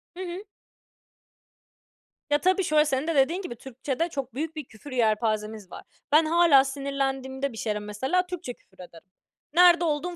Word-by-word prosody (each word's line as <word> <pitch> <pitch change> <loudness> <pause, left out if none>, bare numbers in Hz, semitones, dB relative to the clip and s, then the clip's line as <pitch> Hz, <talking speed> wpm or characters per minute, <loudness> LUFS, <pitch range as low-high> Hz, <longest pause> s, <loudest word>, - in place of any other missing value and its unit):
Hı - - -11
hı. 360 +2 -6 1.9
Ya, 290 - +4
tabii 370 +5 +2
şöyle, 305 -2 +3
senin 270 0 -1
de 330 - 0
dediğin 305 +7 +2
gibi, 355 -11 -7
Türkçede 265 +6 -4
çok 275 -7 -5
büyük 315 +5 -4
bir 305 -3 -6
küfür 245 +5 -13
yelpazemiz 215 -4 -1
var. - - -9 0.3
Ben 310 +2 +5
hâlâ 325 -4 +5
sinirlendiğimde 270 -1 -3
bir - - -10
şeylere 210 -1 -2
mesela 260 - -1
Türkçe 355 -9 -6
küfür 190 - -30
ederim. 170 +1 -16 0.4
Nerede 350 0 +6
olduğum 325 +3 -2
275 Hz, 160 wpm, -26 LUFS, 240-330 Hz, 1.9 s, Nerede